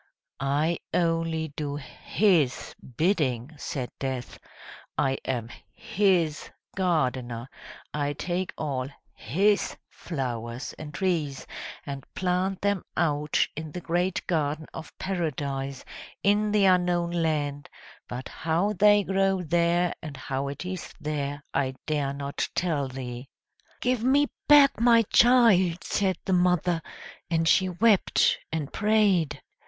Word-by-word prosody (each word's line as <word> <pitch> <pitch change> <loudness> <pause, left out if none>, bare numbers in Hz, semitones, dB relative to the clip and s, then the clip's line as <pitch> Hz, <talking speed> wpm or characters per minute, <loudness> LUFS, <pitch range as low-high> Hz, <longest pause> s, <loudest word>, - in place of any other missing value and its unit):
"I 145 +5 +1 0.2
only 165 -2 0
do 145 -2 -3
His 150 +1 0 0.2
bidding!" 150 - +1
said 130 -4 -4
Death. 130 -3 -4 0.6
"I 135 -2 +1
am 120 -3 -2 0.3
His 180 -7 +1 0.3
gardener, 130 -9 0 0.5
I 145 -1 -1
take 175 +5 -2
all 135 -4 -2 0.2
His 200 +5 +1
flowers 125 -5 -4
and 155 -1 -7
trees, 155 -5 -1 0.4
and 140 -2 -6
plant 185 +1 0
them 200 -2 0
out 150 -2 +1
in 155 0 -6
the - - -4
great 175 +2 -1
garden 155 -2 -1
of 160 - -8
Paradise, 140 -7 -3 0.4
in 205 +1 +3
the 205 -1 +4
unknown 180 -2 +3
land; 150 -4 -1 0.4
but 125 +1 -5
how 170 +6 0
they 205 +1 +5
grow 195 -1 +1
there, 170 +2 +2
and 150 -4 -7
how 135 +1 -3
it 140 +6 -6
is 185 -2 -5
there 145 -1 -3
I 130 -2 0
dare 145 -3 0
not 140 0 -3
tell 155 -6 0
thee." 130 0 -7 0.5
"Give 250 -2 +1
me 280 +3 +3 0.2
back 290 -4 +7
my 230 -1 +6
child!" 210 -8 +5
said 190 -3 0
the 190 - +1
mother, 180 -1 +2 0.5
and 165 -1 +1
she 185 +3 +4
wept 205 +3 +3
and 155 -3 -3
prayed. 210 -7 +2
165 Hz, 120 wpm, -27 LUFS, 140-185 Hz, 0.6 s, back